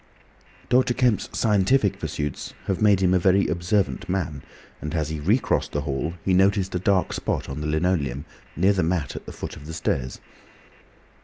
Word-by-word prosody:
Dr. 125 -1 +3
Kemp's 120 -6 +1
scientific 105 +1 +2
pursuits 75 -2 -4
have 95 - -1
made 100 -3 +4
him 90 -1 +3
a 95 - +4
very 95 +2 +3
observant 85 - 0
man, 85 -7 -2 0.4
and 75 +3 -4
as 80 -2 -1
he 80 -1 -4
recrossed 105 - +1
the 75 - 0
hall, 75 +4 -3
he 95 - +2
noticed 95 +1 +3
a 90 - 0
dark 95 0 +1
spot - - -2
on 70 +2 -5
the 75 - -2
linoleum 75 -4 0 0.3
near 95 +4 +3
the 95 - +1
mat 85 -4 -1
at - - -8
the - - -6
foot - - -7
of 75 0 -11
the 80 - -6
stairs. 65 -5 -2
90 Hz, 180 wpm, -24 LUFS, 75-100 Hz, 0.4 s, made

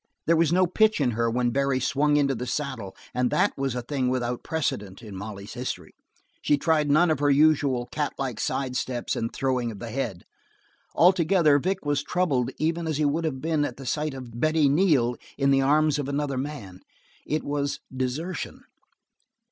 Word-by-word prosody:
There 165 - +4
was 165 -1 +3
no 185 +1 +4
pitch 215 +4 +2
in 130 -4 +2
her 115 +1 0
when 120 +1 0
Barry 140 0 +1
swung 145 +3 +2
into 140 -2 +2
the 125 0 -5
saddle 125 -7 -4 0.2
and 125 0 +1
that - - +1
was 135 -2 -2
a 125 - -3
thing 130 -1 -1
without 125 -1 -1
precedent 105 -12 -3
in 105 -3 -9
Molly's 100 +1 -7
history. 120 -9 -5 0.5
She 145 - +2
tried 150 -1 +1
none 160 +4 +4
of 155 - 0
her 145 0 +2
usual 140 -4 +3
catlike 135 -5 -3
side 130 -2 -2
steps 125 -1 -2
and 115 0 -2
throwing 130 -3 -1
of 105 - -9
the 115 +2 -7
head. 110 -8 -3 0.7
Altogether, 170 -4 +4
Vic 185 +3 -2
was 145 -1 +1
troubled 145 -8 0
even 165 +1 -1
as 155 -3 -1
he 150 - +1
would 155 +3 0
have 130 -4 -3
been 155 -2 +1
at 125 -4 -3
the 135 - -9
sight 150 +2 -2
of 120 -3 -8
Betty 155 +1 +3
Neal 140 -6 +3 0.2
in 140 -1 +2
the 135 0 +4
arms 150 +2 +3
of 140 -1 -3
another 140 -1 -1
man. 130 -9 -5 0.5
It 155 +1 -1
was 145 0 -2 0.2
desertion. 135 +8 -3
140 Hz, 190 wpm, -26 LUFS, 125-155 Hz, 0.7 s, There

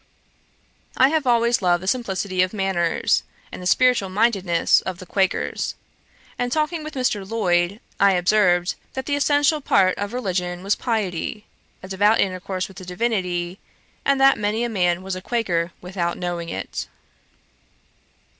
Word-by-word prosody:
I 260 - +6
have 310 -3 0
always 235 -1 +3
loved 175 -1 +2
the - - -6
simplicity 195 -5 -1
of 185 +2 0
manners, 190 -5 +1 0.3
and - - -8
the 180 - -3
spiritual 250 -3 +3
mindedness 190 -4 +2
of 185 -2 -5
the 185 - -10
Quakers; 190 +1 -1 0.6
and 245 0 -1
talking 310 +2 -1
with 310 -1 -8
Mr. 250 -6 0
Lloyd, 190 -2 0 0.2
I 200 -1 +5
observed, 180 -1 +3 0.2
that 265 - -4
the 285 - 0
essential 290 +1 +2
part 190 -7 +3
of 205 +1 -3
religion 180 -6 -3
was 200 +2 +1
piety, 210 -2 -3 0.4
a - - -7
devout 205 +3 +3
intercourse 185 0 -1
with 195 - -15
the 190 - -8
Divinity; 180 -2 -2 0.4
and 275 -1 +2
that 270 0 +5
many 210 +3 0
a 240 - -1
man 180 -4 0
was 190 0 -4
a 185 - -6
Quaker 185 -7 -1
without 180 -1 -3
knowing 175 -1 -4
it. - - -5
195 Hz, 155 wpm, -22 LUFS, 180-235 Hz, 0.6 s, I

